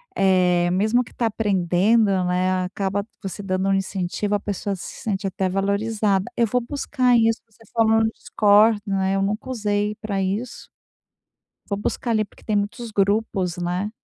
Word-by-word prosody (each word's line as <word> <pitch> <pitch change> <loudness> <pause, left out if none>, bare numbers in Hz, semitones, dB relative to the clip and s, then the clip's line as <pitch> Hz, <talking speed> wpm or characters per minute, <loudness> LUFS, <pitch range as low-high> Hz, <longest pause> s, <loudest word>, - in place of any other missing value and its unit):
eh, 180 -2 +3
mesmo 215 +6 +2
que - - -16
está 235 - -2
aprendendo, 205 +1 +2 0.2
né, 185 +1 +1
acaba 195 +2 -2 0.2
você 195 +1 -6
dando 185 0 -1
um - - +3
incentivo, 195 +1 -2
a - - 0
pessoa 200 0 -3
se 180 - -9
sente 200 -2 -2
até 190 0 -1
valorizada. 200 +1 0
Eu 235 -1 +2
vou 250 +4 +1
buscar 255 -1 +1
isso. 225 0 +2
Você 225 0 -22
falou 225 -1 +4
no 220 0 +2
Discord, 210 +1 +3
né? 195 0 0
Eu 195 - +1
nunca 210 +5 -2
usei 210 -3 -1
para 205 -2 -2
isso. 205 +6 -4 1.0
Vou 200 - -2
buscar 235 +3 -2
ali 215 -1 +2
porque - - -22
tem 215 -2 0
muitos 210 +3 -3
grupos 200 -3 0
né? 180 +4 -2
205 Hz, 165 wpm, -22 LUFS, 190-220 Hz, 1.0 s, falou